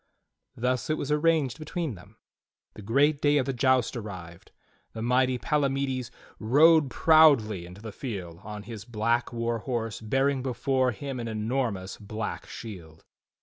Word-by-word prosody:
Thus 125 +2 -1
it 155 - +1
was 145 - -3
arranged 150 -4 +2
between 155 -2 -3
them. 100 +3 -15 0.6
The - - -11
great 140 +8 +2
day 145 0 +4
of 135 - +1
the 135 - -2
joust 130 0 +2
arrived. 95 -5 -8 0.4
The 110 - -5
mighty 125 +1 +2
Palamides 135 0 -1 0.3
rode 145 +6 +5
proudly 125 - +4
into 90 +4 -13
the 110 - -6
field 95 - -6
on 105 0 -8
his 105 -2 -8
black 115 +2 0
war 115 -1 -2
horse 115 -3 -3
bearing 135 +4 +1
before 130 0 0
him 135 +3 -6
an 115 - -4
enormous 110 -3 -2
black 105 +1 -5
shield. 85 -9 -10
120 Hz, 150 wpm, -27 LUFS, 105-135 Hz, 0.6 s, rode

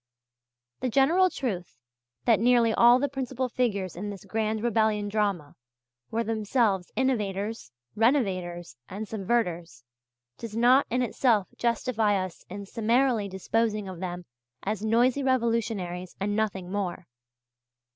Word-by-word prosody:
The 255 - -1
general 320 +10 +4
truth 185 - -4 0.5
that 230 -3 +4
nearly 235 -1 +4
all 240 +2 +6
the 285 +2 0
principal 260 -1 -3
figures 210 -7 -1
in 200 +4 -5
this 200 -1 -8
Grand 215 +1 -1
Rebellion 220 -3 +1
Drama 200 -8 -1 0.6
were 230 +1 -1
themselves 215 -3 0
innovators, 215 - -1 0.2
renovators, 185 - 0
and 205 +3 -5
subverters, 180 - -2 0.6
does 225 -1 -6
not 250 +4 +5
in 250 +2 +1
itself 230 -5 +1
justify 225 -3 +1
us 185 -3 -4
in 200 +2 -7
summarily 230 +1 +1
disposing 210 +2 -1
of 185 -3 -7
them 180 -1 -5 0.4
as 210 +1 -2
noisy 240 +5 +3
revolutionaries 225 -8 -1
and 205 +1 -1
nothing 195 -4 -2
more. 190 -3 -3
215 Hz, 125 wpm, -27 LUFS, 190-240 Hz, 0.6 s, all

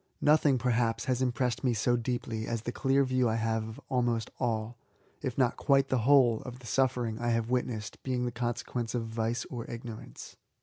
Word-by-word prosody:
Nothing, 150 -2 +4
perhaps, 115 -2 +1
has 130 -1 0
impressed 125 0 0
me 125 -3 +2
so 120 +3 +2
deeply 115 -2 -3
as 115 -2 -2
the 120 - -2
clear 135 +2 +2
view 130 -2 +2
I 110 - 0
have 110 -1 -1
of 110 - -10
almost 120 -3 0
all, 115 -2 -1 0.5
if 130 -4 -3
not 125 -3 +2
quite 135 -1 +3
the 130 - +2
whole, 125 -6 +5
of 125 -1 -8
the 125 - -15
suffering 120 -2 0
I 120 0 0
have 115 0 0
witnessed 120 -4 -2
being 125 -2 -1
the 120 - -1
consequence 120 0 -3
of 115 -2 -1
vice 115 +1 -2
or 120 -2 -5
ignorance. 115 -1 -8
120 Hz, 190 wpm, -30 LUFS, 115-130 Hz, 0.5 s, whole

